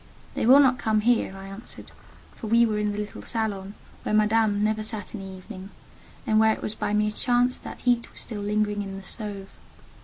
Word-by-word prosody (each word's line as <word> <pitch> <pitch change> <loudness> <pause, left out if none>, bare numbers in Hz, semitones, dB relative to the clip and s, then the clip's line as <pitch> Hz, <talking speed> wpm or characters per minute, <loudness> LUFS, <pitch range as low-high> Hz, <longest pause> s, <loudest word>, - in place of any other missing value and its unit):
"They - - -1
will 265 +3 +9
not 260 -3 +4
come 215 -1 +1
here," 225 -4 +1
I 195 - -9
answered; 195 +4 -9 0.4
for 220 - -7
we 230 +2 +5
were 215 -2 0
in 210 0 0
the 205 - -5
little 210 -1 -5
salon 205 -3 -3 0.3
where 215 - -1
Madame 215 -1 +3
never 215 0 +1
sat 215 -2 -6
in 215 - -5
the 190 -1 -8
evening, 185 0 -10 0.6
and 215 0 +3
where 220 0 +5
it - - -11
was 215 - -2
by 210 - -2
mere 210 0 +2
chance 245 +3 +1
that - - -9
heat 240 -1 +1
was - - -11
still 210 -3 -6
lingering 210 0 0
in 195 -1 -6
the 195 - -9
stove. 200 -1 -5
215 Hz, 215 wpm, -26 LUFS, 205-225 Hz, 0.6 s, will